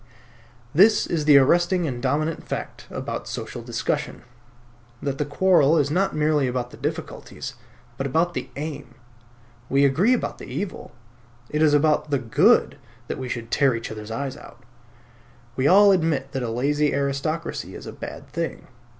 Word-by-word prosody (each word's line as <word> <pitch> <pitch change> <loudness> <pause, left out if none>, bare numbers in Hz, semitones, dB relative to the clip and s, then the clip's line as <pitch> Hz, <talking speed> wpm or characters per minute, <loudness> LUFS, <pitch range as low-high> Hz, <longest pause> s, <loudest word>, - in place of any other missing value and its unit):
This 205 +6 +5
is 160 -3 -2
the 150 -2 +8
arresting 175 +6 +3
and 125 -5 -4
dominant 150 +5 -1
fact - - -6
about - - -6 0.2
modern - - -19
social - - -6
discussion; - - -3 0.8
that 140 0 -3
the 150 - 0
quarrel 165 0 +4
is 145 -1 +1
not 190 +5 +1
merely 150 -2 +2
about 125 -1 -3
the - - -12
difficulties, 145 -1 -5 0.4
but 135 - -2
about 165 +6 +1
the - - -5
aim. 145 -4 -6 0.7
We 140 +1 +4
agree 175 - +3
about 250 - -2
the - - -9
evil; 200 -2 -5 0.6
it 150 - 0
is 150 -2 +5
about 150 +1 +2
the 140 - +2
good 120 -4 +3 0.3
that - - -4
we 130 -1 -5
should 115 -1 -5
tear 140 -4 +3
each 115 -1 -5
other's 105 -1 -8
eyes 135 +4 -4
out. 130 - -14 0.9
We 130 +2 +1
all 200 +4 +7
admit 160 -7 +1
that 135 - -3
a 120 - -2
lazy 145 +5 +1
aristocracy 140 +4 -2
is - - -9
a - - -7
bad - - -8
thing. 165 +3 -4
145 Hz, 165 wpm, -24 LUFS, 135-160 Hz, 0.9 s, the